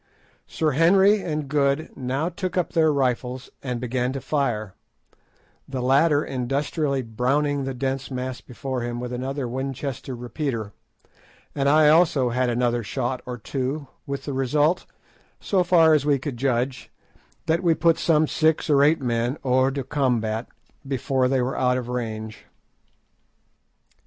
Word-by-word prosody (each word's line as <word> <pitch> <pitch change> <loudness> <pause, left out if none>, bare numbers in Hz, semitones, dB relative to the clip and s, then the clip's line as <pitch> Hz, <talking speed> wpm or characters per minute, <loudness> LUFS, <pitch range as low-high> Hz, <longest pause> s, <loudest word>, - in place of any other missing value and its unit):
Sir 155 -2 0
Henry 190 +7 +4
and 155 -4 -3
Good 140 +1 0
now 135 +5 -2
took 185 +1 -4
up 180 - 0
their 160 -2 +4
rifles 130 -2 -1
and 125 -3 -3
began 125 +1 -1
to 135 - -3
fire, 120 -8 -1 0.9
the 135 -1 -4
latter 145 +4 +3
industriously 135 +2 -1
"browning" 135 +5 0
the 135 -1 -4
dense 135 +1 -2
mass 130 -1 -4
before 130 +1 -5
him 120 0 -3
with 125 0 -5
another 130 +1 -3
Winchester 135 +1 -4
repeater, 120 -3 -4 0.8
and 140 -1 +1
I 150 +1 +6
also 155 -6 +4
had 125 +1 0
another 120 0 +1
shot 125 +2 -3
or 125 -1 -4
two, 135 +5 -3 0.2
with 140 0 -4
the 140 - -3
result, 145 +6 +1 0.5
so 190 -3 +1
far 165 -2 +5
as 150 -3 +3
we 145 -1 +3
could 135 0 -5
judge, 125 0 -1 0.6
that 165 +2 +1
we 170 -3 +3
put 165 0 +3
some 155 -2 +3
six 155 0 +1
or 140 -1 +5
eight 155 +1 +3
men 120 +2 -1
hors 130 +1 +3
de 140 -1 -3
combat 120 -5 -1 0.4
before 130 -1 0
they 130 -1 +1
were 130 - -2
out 125 0 +2
of 125 -1 -5
range. 110 -3 -5
135 Hz, 150 wpm, -24 LUFS, 125-150 Hz, 0.9 s, I